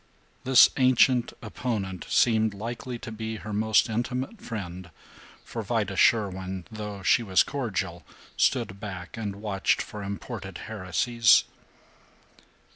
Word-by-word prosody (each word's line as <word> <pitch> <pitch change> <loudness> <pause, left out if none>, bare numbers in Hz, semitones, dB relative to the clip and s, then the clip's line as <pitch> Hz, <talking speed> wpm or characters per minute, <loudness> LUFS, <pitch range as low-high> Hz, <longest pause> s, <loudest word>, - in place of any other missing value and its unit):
This 130 -1 +8
ancient 130 -1 +4
opponent 105 -5 -4
seemed 110 -3 +3
likely 120 +4 -5
to 115 0 -8
be 110 0 -5
her 105 +1 -7
most 110 +1 +3
intimate 125 - -3
friend, 95 -5 -6 0.6
for - - -5
Vida - - -1
Sherwin, 95 -4 +1
though 105 -2 -6
she 120 - +4
was 95 -5 +3
cordial, 95 -10 -3 0.3
stood 100 0 +1
back 95 -3 -7
and 105 -3 -4
watched 100 -2 0
for 105 - -6
imported 100 -1 -6
heresies. 110 +3 +3
110 Hz, 120 wpm, -27 LUFS, 95-115 Hz, 0.6 s, This